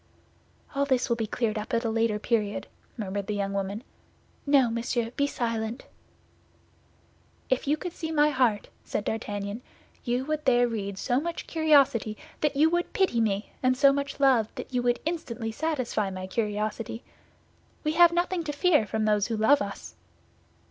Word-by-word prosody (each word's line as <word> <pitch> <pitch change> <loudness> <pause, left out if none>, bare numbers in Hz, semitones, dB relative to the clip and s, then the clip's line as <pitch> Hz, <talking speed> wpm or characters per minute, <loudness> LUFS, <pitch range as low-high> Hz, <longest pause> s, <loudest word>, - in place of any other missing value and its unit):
"All 280 0 +1
this 260 -3 +1
will 235 - +3
be 225 -2 -2
cleared 220 -1 -1
up 215 +4 -3
at 230 +1 0
a - - +1
later 225 -1 +1
period," 210 -2 -1 0.3
murmured 200 -2 -3
the 210 - -2
young 200 -1 -2
woman; 200 +3 -3 0.6
"no, 280 -3 +5
monsieur, 235 0 -1
be 285 +3 0
silent." 230 -2 -3 1.7
"If 260 +1 +1
you 295 +2 +2
could 350 +2 -6
see 320 -2 -5
my 300 -1 +4
heart," 245 -7 +1
said 205 - -3
D'Artagnan, 205 0 -3 0.4
"you 245 +1 -1
would 305 0 -2
there 245 -2 +4
read 200 -4 -4
so 245 +4 +1
much 335 +3 -4
curiosity 280 -9 +3 0.2
that 300 -2 0
you 300 +3 +5
would 345 0 -1
pity 370 -12 +2
me 205 -1 -1
and 255 0 +2
so 275 0 +6
much 280 0 -3
love 260 -6 +4
that - - -8
you 250 - +1
would 245 0 +1
instantly 245 -9 -3
satisfy 255 -7 -1
my 185 -1 -6
curiosity. 215 +3 -3 0.8
We 305 - +1
have 340 +1 +6
nothing 350 0 0
to 295 - -2
fear 295 - +3
from 220 +1 -1
those 210 -1 +2
who 230 -2 -2
love 275 +7 +4
us." 200 0 -6
240 Hz, 170 wpm, -27 LUFS, 215-285 Hz, 1.7 s, so